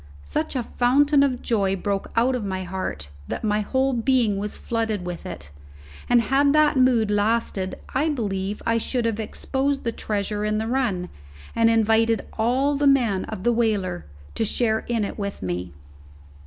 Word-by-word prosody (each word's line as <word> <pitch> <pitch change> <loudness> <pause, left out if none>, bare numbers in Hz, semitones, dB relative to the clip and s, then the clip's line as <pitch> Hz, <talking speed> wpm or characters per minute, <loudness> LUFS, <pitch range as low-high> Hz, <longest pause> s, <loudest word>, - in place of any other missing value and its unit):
Such 70 - -3
a 250 - 0
fountain 280 +5 +3
of 260 -3 +1
joy 200 -5 +1
broke 195 +1 -2
out 240 +3 +3
of 250 -3 -2
my 190 -1 -3
heart 180 - -5 0.2
that - - -4
my 210 -1 +1
whole 265 +5 0
being 235 -3 +2
was 205 +1 -3
flooded 225 -5 -2
with 175 -1 -6
it, 75 0 -8 0.6
and 240 -1 +5
had 275 +5 +3
that 305 -1 +4
mood 250 -5 +3
lasted 205 -2 0 0.2
I 290 +5 +1
believe 205 -7 -3
I 230 0 +2
should 245 +1 -1
have 225 -1 -1
exposed 270 +5 -2
the 230 - -1
treasure 210 -1 -3
in 215 0 0
the 220 - -1
run, 225 -8 -1 0.5
and 230 0 +4
invited 225 0 +2
all 260 +6 +1
the 285 0 +2
men 240 -9 +3
of 215 -4 -7
the 240 - +3
whaler 205 - 0 0.3
to - - -1
share 220 0 +1
in 230 -3 0
it 200 - -6
with 200 - -4
me. 90 -1 -3
225 Hz, 175 wpm, -24 LUFS, 200-250 Hz, 0.6 s, and